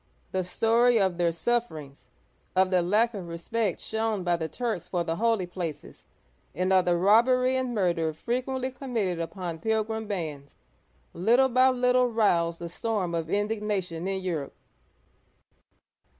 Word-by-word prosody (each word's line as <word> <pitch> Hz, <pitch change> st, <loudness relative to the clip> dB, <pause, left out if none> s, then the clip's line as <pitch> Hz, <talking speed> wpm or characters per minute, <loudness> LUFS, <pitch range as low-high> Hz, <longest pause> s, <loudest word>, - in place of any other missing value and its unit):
The 185 Hz, 0 st, 0 dB
story 230 Hz, +5 st, +3 dB
of 190 Hz, -3 st, 0 dB
their 170 Hz, -1 st, +2 dB
sufferings, 160 Hz, -7 st, -3 dB, 0.5 s
of 185 Hz, 0 st, +3 dB
the 180 Hz, -1 st, +3 dB
lack 215 Hz, +7 st, +2 dB
of 190 Hz, -5 st, -6 dB
respect 180 Hz, +4 st, -2 dB
shown 220 Hz, -3 st, -2 dB
by 175 Hz, -1 st, +2 dB
the 160 Hz, -1 st, -3 dB
Turks 200 Hz, -, -3 dB
for 175 Hz, -2 st, -1 dB
the 165 Hz, 0 st, -3 dB
holy 225 Hz, -4 st, +1 dB
places, 175 Hz, -3 st, -7 dB, 0.5 s
and 185 Hz, +3 st, +1 dB
of 185 Hz, -1 st, +4 dB
the 175 Hz, -1 st, +2 dB
robbery 250 Hz, +7 st, +4 dB
and 255 Hz, -2 st, -1 dB
murder 170 Hz, -5 st, +1 dB
frequently 255 Hz, +8 st, -3 dB
committed 230 Hz, -10 st, -2 dB
upon 170 Hz, 0 st, -5 dB
pilgrim 220 Hz, +2 st, -1 dB
bands, 155 Hz, -8 st, -5 dB, 0.6 s
little 240 Hz, +9 st, +3 dB
by 255 Hz, +1 st, +5 dB
little 250 Hz, 0 st, +3 dB
roused 175 Hz, -8 st, +1 dB
a 170 Hz, -, -5 dB
storm 195 Hz, -1 st, -2 dB
of 165 Hz, -1 st, -2 dB
indignation 205 Hz, -4 st, -2 dB
in 195 Hz, 0 st, -2 dB
Europe. 165 Hz, -7 st, -4 dB
195 Hz, 145 wpm, -27 LUFS, 170-230 Hz, 0.6 s, by